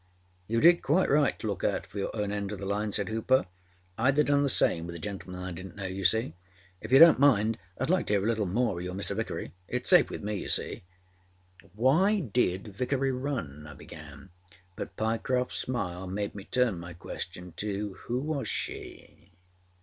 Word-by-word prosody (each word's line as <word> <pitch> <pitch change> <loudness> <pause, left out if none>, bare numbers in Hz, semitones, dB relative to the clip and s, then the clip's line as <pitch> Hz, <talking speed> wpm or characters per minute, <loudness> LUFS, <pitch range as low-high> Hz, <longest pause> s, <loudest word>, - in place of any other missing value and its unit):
â 115 - -1
âYou - - +2
did 170 +1 +7
quite 170 +3 +2
right 145 0 +3
to - - -8
look 100 -3 -3
out 100 - 0
for 100 +2 -8
your 100 - -1
own 105 -2 -1
end 100 -1 -3
oâ 105 - -5
the 100 - -6
line,â 105 +2 -1
said 100 -1 -1
Hooper. 115 +4 +2 0.5
âIâd 130 +4 +3
haâ 150 0 +4
done 145 0 +3
the 140 - +2
same 85 -8 +3
with 85 - -7
a - - -5
gentleman 90 +1 -6
I 90 - -4
didnât 95 +2 -8
know, 100 -2 -6
you 95 +1 -4
see. 110 -2 +3 0.5
If 110 - -8
you 135 - +8
donât 165 0 +9
mind 115 -6 +4 0.2
Iâd 130 - -1
like 185 0 +2
to - - +1
hear 100 -1 +2
a - - +1
little 110 -3 0
more 110 0 0
oâ 85 - -4
your 90 0 -5
Mr. 100 0 -2
Vickery. 110 -4 -4 0.2
Itâs - - -2
safe - - +6
with - - -6
me, 105 0 -2
you - - -6
see.â 90 0 -6
âWhy 160 - +2
did 100 -3 0
Vickery 135 +3 0
run,â 105 - -4
I - - -15
began, 75 +1 -12 0.4
but - - -7
Pyecroftâs 115 +3 0
smile 95 -7 -2
made 100 +2 -3
me 100 -1 -9
turn 120 -7 +1
my 85 +1 -8
question 90 +1 -7
to 105 -1 -3
âWho 125 +2 -1
was 150 -3 -2
she? - - -6
105 Hz, 210 wpm, -29 LUFS, 90-125 Hz, 0.5 s, donât